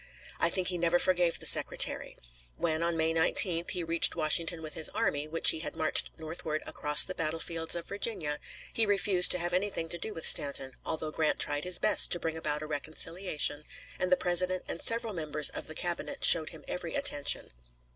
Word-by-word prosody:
I 170 - +2
think 185 +1 0
he 180 -1 -2
never 170 +1 +1
forgave 175 -2 0
the - - -9
Secretary. - - +1 0.4
When, 160 -1 -2
on 170 0 -2
May 160 0 0
19th, 165 +1 +2
he 180 - -2
reached 165 0 +1
Washington 160 +1 0
with 155 -1 -7
his 160 - +3
army, 145 +1 -2
which 165 +2 +4
he 160 - -5
had 160 - -7
marched 155 - +3
northward 160 -1 -5
across 150 0 +6
the 185 - -6
battlefields 165 0 -4
of 170 -1 -6
Virginia, 195 -8 -3 0.3
he 225 -1 +2
refused 195 -2 +2
to - - +1
have 175 0 -4
anything 180 -3 -2
to 175 - -3
do 220 - -6
with 165 - -4
Stanton, 140 -2 +2
although 155 -1 -5
Grant 155 -1 -1
tried 145 +1 0
his 180 -1 +1
best - - +4
to 175 - -2
bring 165 -1 -4
about 150 -2 -4
a - - -6
reconciliation 155 0 -2 0.4
and 185 0 -2
the 180 - +4
President 180 +1 -1
and - - -6
several 230 -1 0
members 155 -3 +2
of - - -7
the 155 - -10
Cabinet 175 - -4
showed 160 -2 +6
him - - -15
every 180 - -6
attention. 275 - 0
165 Hz, 195 wpm, -29 LUFS, 155-180 Hz, 0.4 s, across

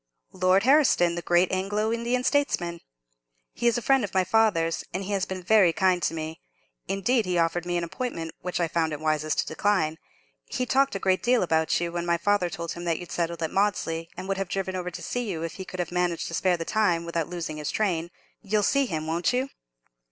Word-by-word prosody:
"Lord 185 +1 +3
Herriston, 260 - +4
the 175 - -3
great 175 +1 +3
Anglo 205 +4 0
Indian 240 +2 -1
statesman. 175 - 0 0.7
He 240 - 0
is 235 - +3
a 240 - -3
friend 270 0 +3
of 200 - -5
my 190 - +4
father's, 185 -5 +2
and 185 +2 -3
he 200 - -5
has 195 -2 0
been 185 -1 -6
very 195 -2 +5
kind 185 +1 +2
to 165 - 0
me—indeed, 160 - -3
he 180 -1 0
offered 170 +1 0
me 175 0 0
an 175 - -1
appointment, 170 -3 -4
which 180 0 -3
I 170 - +2
found 160 -1 0
it 150 - -4
wisest 155 0 0
to - - +1
decline. 160 -2 0 0.5
He 255 -2 -2
talked 270 0 +2
a - - -1
great 185 -1 +1
deal 245 -2 +3
about 160 -2 +1
you, 170 0 -2
when 175 0 -3
my 170 0 +2
father 195 0 +1
told 170 -1 -5
him 170 - -6
that 165 -2 +1
you'd 175 - -9
settled 170 -1 -2
at 160 - -2
Maudesley, 165 -5 0
and 190 - -6
would 195 0 -1
have 195 -2 -3
driven 190 -1 -2
over 180 -1 -3
to 175 0 -8
see 245 +5 -3
you 165 -4 -3
if 165 -1 -4
he 190 - -6
could 185 - -8
have 175 - -2
managed 175 -1 0
to - - -8
spare 180 +1 +2
the 165 - -4
time, 180 -6 +1
without 170 -1 -2
losing 170 -3 -4
his 150 -1 -3
train. 175 -6 0 0.3
You'll 210 0 0
see 275 +5 +2
him, 155 -5 -3
won't 165 +2 0
you?" 255 +2 0
180 Hz, 230 wpm, -26 LUFS, 165-205 Hz, 0.7 s, very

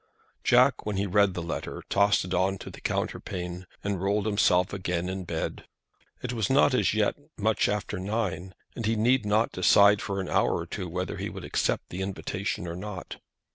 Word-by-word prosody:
Jack, 125 +2 +4
when 105 - -1
he 100 - 0
had 95 -3 -4
read 100 -2 +4
the 90 - -3
letter, 85 - -5
tossed 100 -1 +3
it 90 - -4
on 95 +2 +1
to - - -9
the - - -12
counterpane, 90 0 -3 0.2
and 100 -3 -2
rolled 100 +1 +1
himself 95 -3 +3
again 90 -2 -2
in 95 0 -4
bed. 80 -2 -4 0.6
It 125 0 -2
was 110 -4 -1
not 135 0 +4
as 125 - +2
yet 105 -1 +2 0.2
much 110 0 +2
after 105 -3 -2
nine, 95 -2 -3 0.2
and 115 -3 -3
he 115 - +2
need 120 +1 +2
not 110 +2 +2
decide 100 +2 +5
for 100 0 -3
an 95 - -3
hour - - +2
or - - -4
two 90 - -5
whether 90 +2 -3
he - - -3
would - - -8
accept - - -1
the 90 - -5
invitation 95 +1 -3
or 85 - -4
not. 95 0 -7
100 Hz, 200 wpm, -27 LUFS, 90-105 Hz, 0.6 s, decide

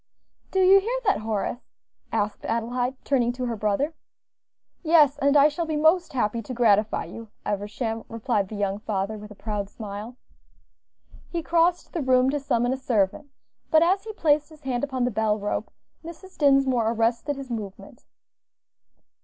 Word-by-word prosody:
"Do 380 - +1
you 385 +2 +7
hear 475 +5 -2
that, 400 - +3
Horace?" 215 +2 -2 0.5
asked 205 0 -2
Adelaide, 245 +3 -1
turning 245 -4 +1
to 250 0 -4
her 235 -1 -2
brother. 215 +9 0 0.9
"Yes, 305 -4 +4
and 280 +1 +4
I 285 +1 +7
shall 320 +2 -3
be 310 - -1
most 320 +3 +3
happy 235 -2 0
to 250 +3 -7
gratify 215 -3 +2
you, 230 0 -9 0.2
Eversham," 220 +3 -3
replied 225 -3 -1
the 215 - -8
young 200 -1 -1
father, 210 0 -2
with 210 0 -10
a 210 - -12
proud 205 -1 -4
smile. 215 +3 -8 1.1
He 335 -2 -3
crossed 340 +2 +1
the 335 - -2
room 260 0 +3
to 290 - -1
summon 245 -2 0
a - - -3
servant, 235 +1 0 0.4
but 315 0 +5
as 380 +3 +2
he 440 0 -7
placed 300 -6 +2
his 310 -1 -16
hand 255 -3 -2
upon 260 -3 -1
the 250 - 0
bell 215 0 +1
rope, 205 0 -3 0.3
Mrs. 340 +3 -11
Dinsmore 270 -5 +3
arrested 235 +5 0
his 270 -2 -8
movement. 205 -4 -7
250 Hz, 165 wpm, -25 LUFS, 215-300 Hz, 1.1 s, you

